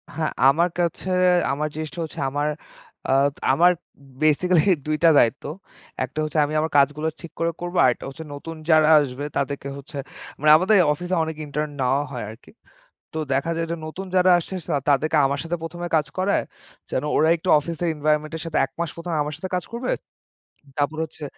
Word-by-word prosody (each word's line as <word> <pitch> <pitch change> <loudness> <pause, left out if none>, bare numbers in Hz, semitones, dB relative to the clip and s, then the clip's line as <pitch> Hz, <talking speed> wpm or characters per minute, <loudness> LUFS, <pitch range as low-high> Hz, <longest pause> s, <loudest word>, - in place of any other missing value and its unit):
হ্যাঁ, 155 0 -1 0.2
আমার 170 +6 +3
কাছে 175 +2 -1 0.4
আমার 150 +2 -1
জিনিসটা 155 +2 -6
হচ্ছে 160 +1 -8
আমার, 145 +2 -1 0.6
আ - - +3 0.4
আমার 175 +6 +5 0.5
বেসিক্যালি 155 +2 +3 0.2
২ 155 0 0
টা 165 - +8
দায়িত্ব। 120 +4 +2 0.6
একটা 130 +4 -5
হচ্ছে 155 +1 -3
আমি 150 - -5
আমার 160 +1 -1
কাজগুলো 150 +2 +2
ঠিক 170 - -9
করে 165 0 +1
করব, 175 +1 -5
আরেকটা 125 -2 +2
হচ্ছে 160 +4 -9
নতুন 165 +3 -7
যারা 155 -1 +6
আসবে 140 0 -3
তাদেরকে 140 0 -2
হচ্ছে 140 +1 -10 0.4
মানে, 150 +2 +3
আমাদের 190 +5 +3 0.2
অফিসে 180 +4 -3
অনেক 160 0 -4
ইন্টার্ন 150 +1 -3
নেওয়া 130 +2 +2
হয় 125 - -5
আরকি। 110 - -15 0.6
তো - - -4 0.2
দেখা 140 +5 0
যায় 165 0 -1
যে - - -1
নতুন 185 +5 -7
যারা 185 0 +5
আসছে, 175 +2 -5 0.4
তাদেরকে 155 +3 +2
আমার 140 +1 0
সাথে 165 +1 -2
১ম 165 +1 -7
এ - - -12
কাজ 150 -2 +2
করায়, 190 +2 +1 0.5
যেন 130 - -1
ওরা 160 - +4
একটু 165 - -9
অফিসের 170 +3 -4
এনভাইরনমেন্টের 155 +1 0
সাথে, 165 -2 -2
১ 135 - -17
মাস 170 -2 -1
১ম 170 +1 -6
এ - - 0
আমার 150 +1 -5
সাথে 185 +3 -6
কাজ 180 - -1
করবে। 245 +2 -2 0.9
তারপর 150 +2 0
হচ্ছে 160 -1 -10
155 Hz, 185 wpm, -23 LUFS, 145-170 Hz, 0.9 s, টা